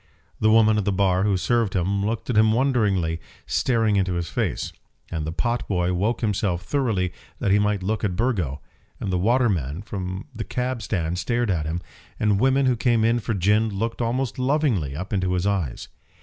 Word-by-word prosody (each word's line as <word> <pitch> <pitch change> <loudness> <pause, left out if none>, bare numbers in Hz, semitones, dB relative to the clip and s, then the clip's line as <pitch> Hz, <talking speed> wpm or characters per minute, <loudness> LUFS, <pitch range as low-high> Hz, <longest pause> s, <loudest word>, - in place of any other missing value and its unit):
The 110 - +3
woman 110 -1 +5
at 100 - -2
the 100 - +2
bar 95 -1 +2
who 100 -2 +2
served 115 0 +1
him 100 +2 0
looked 115 +4 -2
at - - -2
him 110 0 +5
wonderingly, 105 -11 +1 0.2
staring 115 -5 +1
into 95 -2 +1
his 85 -2 -2
face; - - -2 0.4
and 80 -2 -3
the - - -2
pot 120 +7 -1
boy 90 -2 0
woke 105 +7 0
himself 100 -4 0
thoroughly 110 -8 0 0.2
that 100 - 0
he 100 - +5
might 105 -2 +1
look 110 +4 -1
at 95 -4 0
Burgo; 90 - -1 0.4
and 95 - -3
the 90 - +1
waterman 100 - +1
from 95 -2 -5
the 110 - -3
cab 125 +4 -2
stand 90 -4 -2
stared 120 -1 0
at 80 -4 -1
him; 85 +2 -2 0.4
and 105 -2 +2
women 135 +3 +3
who 130 -1 +3
came 115 -2 +2
in 115 +1 +3
for 115 -1 -2
gin 105 +4 +2
looked 115 +4 -3
almost 120 +1 -1
lovingly 125 - +1
up 95 +7 -5
into 95 -2 0
his 90 0 0
eyes. 95 -11 -1
105 Hz, 195 wpm, -24 LUFS, 90-115 Hz, 0.4 s, woman